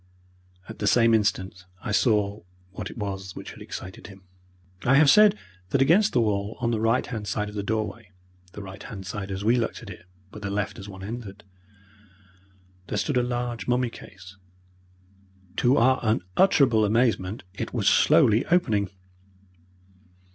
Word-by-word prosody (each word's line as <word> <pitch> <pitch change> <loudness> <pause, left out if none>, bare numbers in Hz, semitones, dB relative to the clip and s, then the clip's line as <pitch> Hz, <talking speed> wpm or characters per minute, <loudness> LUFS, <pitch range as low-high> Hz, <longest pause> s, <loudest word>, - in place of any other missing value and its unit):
At - - -10
the 105 - -1
same 115 +2 +4
instant 95 -4 0 0.2
I - - -3
saw 105 -2 +1 0.3
what 95 0 -6
it - - -11
was 95 -3 -5
which - - -8
had - - -13
excited 95 0 -8
him. 100 -2 -14 0.6
I 135 - +4
have 145 -1 +6
said 210 +2 +6 0.3
that 135 - +1
against 180 +11 +4
the 120 - +3
wall 105 -1 -1
on 120 -1 0
the 115 - 0
right 115 +3 +2
hand 110 -4 -6
side 105 0 -2
of - - -10
the 105 - -3
doorway 110 0 -3 0.4
(the 105 - -8
right 95 +1 -10
hand 95 -3 -8
side 95 +1 -5
as 95 +1 -4
we 120 +3 +4
looked 115 - -3
at - - -9
it, - - -12 0.3
but 105 - -10
the 100 - -4
left 100 0 -3
as 95 +1 -9
one 95 -1 -10
entered) 105 -1 -7 1.4
there 105 - -3
stood 105 +7 -1
a - - +4
large 120 -2 -3
mummy 125 -1 +1
case. 95 -1 -13 1.2
To 130 +3 +3
our 130 +1 +4
unutterable 110 - +3
amazement 110 -2 +1
it - - -5
was - - -1
slowly 110 +2 +5
opening. 110 - +2
105 Hz, 170 wpm, -25 LUFS, 100-120 Hz, 1.4 s, have